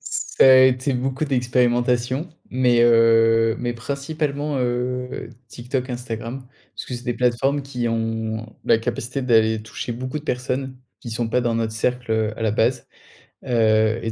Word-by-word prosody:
Ça - - 0
a 130 - +8
été 130 +1 +2
beaucoup 135 +4 -2
d'expérimentation, 125 +2 +1 0.2
mais, 125 -2 +3
heu, 115 -1 +4
mais 120 -1 -2
principalement, 145 +3 -3
heu, 125 +1 -3 0.2
TikTok, 125 +3 -4
Instagram. 120 +1 -6 0.3
Parce - - -7
que 125 - -5
c'est 120 - -7
des 120 - -1
plateformes 125 +4 +1
qui 125 -3 -3
ont 115 0 -3
la 110 - +4
capacité 125 +3 -3
d'aller 110 -3 +3
toucher 115 +2 -6
beaucoup 130 +5 -5
de 150 - -13
personnes, 130 +1 -3 0.2
qui 120 - -8
sont 110 0 -2
pas 125 - +1
dans 120 -1 0
notre 110 -1 -1
cercle 125 +1 -1
heu 110 -1 -1
à 115 - -4
la 110 - +2
base, 120 +3 0 0.6
heu 110 -1 +2
et 115 - -3
120 Hz, 160 wpm, -22 LUFS, 115-130 Hz, 0.6 s, a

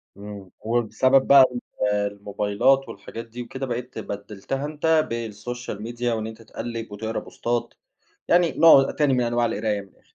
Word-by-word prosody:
اممم، 100 -2 -9
وبسبب 120 +3 +2
بقى 140 -1 +9
ال 120 -1 -5 0.5
الموبايلات 105 +6 +1
والحاجات 115 +3 -8
دي 115 +2 -8
وكده، 130 +3 -5
بقيت 125 -1 -5
بدلتها 105 +7 -5
أنتَ 155 +1 +1
بالسوشيال 115 -1 -5
ميديا 120 +1 -2
وإن 110 -1 -3
أنتَ 110 0 -10
تقلب، 115 0 -6
وتقرا 110 +2 -3
بوستات 120 0 -3 0.5
يعني 175 -1 +4
نوع 150 -4 +6
تاني 145 -3 +2
من 125 - +2
أنواع 120 0 +1
القراية 105 -3 -1
من 100 - -14
الآخر. - - -29
115 Hz, 155 wpm, -24 LUFS, 105-130 Hz, 0.5 s, بقى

